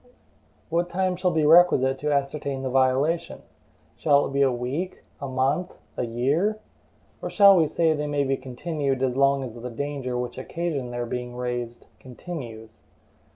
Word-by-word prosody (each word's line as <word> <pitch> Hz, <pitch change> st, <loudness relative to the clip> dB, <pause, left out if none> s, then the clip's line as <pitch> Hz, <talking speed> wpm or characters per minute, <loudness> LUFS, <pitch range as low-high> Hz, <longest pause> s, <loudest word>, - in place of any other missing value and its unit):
What 170 Hz, +2 st, 0 dB
time 185 Hz, +1 st, 0 dB
shall 180 Hz, +1 st, +1 dB
be 160 Hz, -3 st, +1 dB
requisite 150 Hz, -5 st, +5 dB
to 150 Hz, 0 st, -1 dB
ascertain 140 Hz, -1 st, -1 dB
the 130 Hz, -, -2 dB
violation? 135 Hz, +6 st, +1 dB, 0.5 s
Shall 145 Hz, -2 st, +3 dB
it -, -, -6 dB
be 140 Hz, -, +1 dB
a 135 Hz, -1 st, +4 dB
week, 130 Hz, +10 st, -4 dB, 0.2 s
a 140 Hz, -, -3 dB
month, 135 Hz, +7 st, 0 dB, 0.2 s
a -, -, -1 dB
year? 145 Hz, -, 0 dB, 0.6 s
Or -, -, -4 dB
shall 200 Hz, -1 st, +7 dB
we 165 Hz, -4 st, +4 dB
say 160 Hz, +1 st, +2 dB
they 150 Hz, -1 st, -3 dB
may 145 Hz, -1 st, 0 dB
be 135 Hz, 0 st, 0 dB
continued 135 Hz, +1 st, -3 dB
as 125 Hz, -2 st, 0 dB
long 140 Hz, 0 st, +3 dB
as 125 Hz, -4 st, -6 dB
the 120 Hz, +1 st, -7 dB
danger 130 Hz, 0 st, -4 dB
which 125 Hz, +1 st, -4 dB
occasioned 145 Hz, -3 st, -3 dB
their 120 Hz, 0 st, -3 dB
being 125 Hz, +1 st, -5 dB
raised 120 Hz, -1 st, -4 dB
continues? 120 Hz, -5 st, -9 dB
140 Hz, 165 wpm, -25 LUFS, 125-160 Hz, 0.6 s, shall